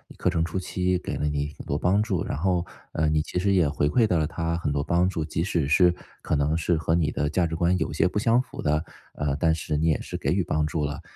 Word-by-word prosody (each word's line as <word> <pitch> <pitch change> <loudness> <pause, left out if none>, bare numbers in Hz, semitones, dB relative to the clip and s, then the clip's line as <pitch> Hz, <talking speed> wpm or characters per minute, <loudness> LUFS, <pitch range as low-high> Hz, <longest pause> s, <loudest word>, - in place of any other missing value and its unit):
课 - - 0
程 80 -2 0
初 85 +3 -3
期 90 0 -1
给 - - -4
了 75 - -1
你 75 0 -1
很 - - -9
多 70 - -2
帮 90 +7 +2
助。 95 -6 -1
然 - - -3
后， 90 +1 +1 0.3
呃， 80 -1 +1
你 75 0 +2
其 90 - -3
实 100 +1 +1
也 90 -6 +4
回 70 0 0
馈 115 +4 +3
到 90 -6 +1
了 75 - +1
她 85 0 -2
很 75 -4 -2
多 70 0 0
帮 85 +3 +2
助， 80 -4 -3
即 80 +1 -2
使 85 -7 0
是 90 +3 +5 0.3
可 80 - -1
能 75 +2 +1
是 85 0 +1
和 80 +1 0
你 80 -3 +2
的 75 - -1
价 90 -1 +2
值 80 - -4
观 85 +2 +2
有 - - -1
些 - - +2
不 105 - -1
相 115 +3 +3
符 130 - -5
的， 75 +2 0 0.3
呃， 70 -2 -1
但 80 +1 +2
是 80 -1 -3
你 80 +2 +1
也 80 - +2
是 - - -7
给 - - -2
予 95 0 +1
帮 75 -1 0
助 75 -2 -1
了。 70 0 -4
80 Hz, 300 characters per minute, -25 LUFS, 75-90 Hz, 0.3 s, 是